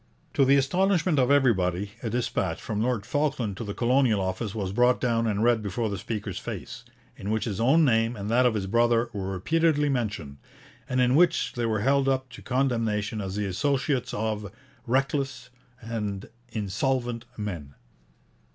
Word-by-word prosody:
To 135 Hz, -, +4 dB
the 135 Hz, +1 st, +5 dB
astonishment 175 Hz, +3 st, +2 dB
of 125 Hz, 0 st, +3 dB
everybody, 100 Hz, -9 st, +2 dB
a 115 Hz, -, -3 dB
dispatch 120 Hz, +2 st, -1 dB
from 105 Hz, -1 st, -3 dB
Lord 115 Hz, -3 st, 0 dB
Falkland 135 Hz, -7 st, -1 dB
to -, -, -4 dB
the 100 Hz, -2 st, -5 dB
Colonial 125 Hz, -3 st, +3 dB
Office 95 Hz, +3 st, -3 dB
was 100 Hz, -4 st, -2 dB
brought 125 Hz, +4 st, +3 dB
down 115 Hz, -2 st, +1 dB
and 105 Hz, 0 st, 0 dB
read 120 Hz, -2 st, +3 dB
before 105 Hz, +2 st, -2 dB
the 100 Hz, -, -3 dB
speaker's 105 Hz, -4 st, -4 dB
face, -, -, -7 dB, 0.3 s
in 100 Hz, -, -6 dB
which 110 Hz, 0 st, 0 dB
his 105 Hz, -4 st, -3 dB
own 150 Hz, +7 st, +5 dB
name 115 Hz, -2 st, +2 dB
and 100 Hz, -2 st, -5 dB
that 125 Hz, +3 st, +4 dB
of 115 Hz, -, 0 dB
his 100 Hz, -3 st, -1 dB
brother 115 Hz, +3 st, +2 dB
were 95 Hz, -2 st, -3 dB
repeatedly 150 Hz, -, +1 dB
mentioned, 105 Hz, -, -3 dB, 0.5 s
and 130 Hz, -1 st, 0 dB
in 125 Hz, 0 st, +3 dB
which 170 Hz, +5 st, +3 dB
they 120 Hz, -1 st, -1 dB
were 110 Hz, -2 st, 0 dB
held 135 Hz, +3 st, +3 dB
up 130 Hz, -1 st, -1 dB
to 120 Hz, -, -11 dB
condemnation 115 Hz, -5 st, 0 dB
as 95 Hz, -1 st, -4 dB
the 105 Hz, 0 st, -1 dB
associates 135 Hz, -, 0 dB
of 105 Hz, -1 st, -3 dB, 0.4 s
'reckless' 135 Hz, 0 st, -1 dB, 0.3 s
and 105 Hz, -4 st, -4 dB, 0.2 s
'insolvent' 120 Hz, +3 st, -1 dB
men. 85 Hz, -10 st, -5 dB
115 Hz, 170 wpm, -26 LUFS, 105-130 Hz, 0.5 s, the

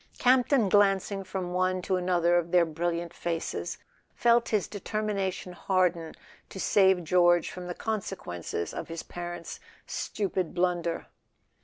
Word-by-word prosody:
Camp 250 Hz, 0 st, +4 dB
ton, 255 Hz, -8 st, +3 dB
glancing 195 Hz, 0 st, +3 dB
from 185 Hz, -1 st, -4 dB
one 185 Hz, 0 st, +1 dB
to 185 Hz, -, 0 dB
another 175 Hz, -1 st, +2 dB
of 170 Hz, 0 st, -4 dB
their 175 Hz, -1 st, +5 dB
brilliant 170 Hz, +1 st, -2 dB
faces, 165 Hz, -1 st, -3 dB, 0.4 s
felt 235 Hz, 0 st, +3 dB
his 210 Hz, -4 st, +1 dB
determination 200 Hz, -3 st, -3 dB
harden 175 Hz, -3 st, 0 dB, 0.3 s
to 190 Hz, -, -8 dB
save 190 Hz, -2 st, +4 dB
George 175 Hz, 0 st, +3 dB
from 180 Hz, -1 st, -7 dB
the 175 Hz, -, -4 dB
consequences 190 Hz, -, -4 dB
of -, -, -5 dB
his 165 Hz, 0 st, -6 dB
parents' 175 Hz, -1 st, -7 dB, 0.3 s
stupid 185 Hz, -5 st, -3 dB
blunder. 175 Hz, -2 st, 0 dB
180 Hz, 135 wpm, -28 LUFS, 175-195 Hz, 0.4 s, their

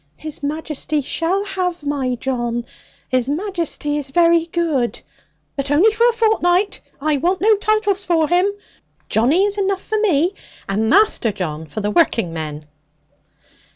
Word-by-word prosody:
'His 310 Hz, -2 st, -7 dB
Majesty 305 Hz, 0 st, -2 dB
shall 360 Hz, +8 st, -1 dB
have 365 Hz, -4 st, -3 dB
my 275 Hz, -3 st, -1 dB
John; 240 Hz, -2 st, -2 dB, 0.4 s
His 255 Hz, -1 st, 0 dB
Majesty 330 Hz, -3 st, -2 dB
is 285 Hz, -2 st, -5 dB
very 335 Hz, +2 st, +3 dB
good: 320 Hz, -8 st, -1 dB, 0.6 s
but 275 Hz, -1 st, -2 dB
only 335 Hz, +10 st, +5 dB
for 465 Hz, +3 st, +3 dB
a -, -, 0 dB
fortnight. 410 Hz, -4 st, +1 dB, 0.2 s
I 300 Hz, +1 st, +1 dB
want 360 Hz, +6 st, 0 dB
no 435 Hz, +2 st, +4 dB
titles 415 Hz, -1 st, +1 dB
for 330 Hz, -4 st, +2 dB
him. 360 Hz, +4 st, +2 dB, 0.6 s
Johnny 275 Hz, -, +3 dB
is 410 Hz, 0 st, -1 dB
enough 390 Hz, -1 st, 0 dB
for 435 Hz, -, -1 dB
me; 355 Hz, -5 st, +2 dB, 0.4 s
and 215 Hz, +3 st, 0 dB
Master 395 Hz, -, +3 dB
John 160 Hz, -5 st, -5 dB
for 185 Hz, +8 st, -5 dB
the 205 Hz, 0 st, -1 dB
working 230 Hz, -, +2 dB
men.' 155 Hz, -2 st, -5 dB
320 Hz, 150 wpm, -19 LUFS, 255-385 Hz, 0.6 s, only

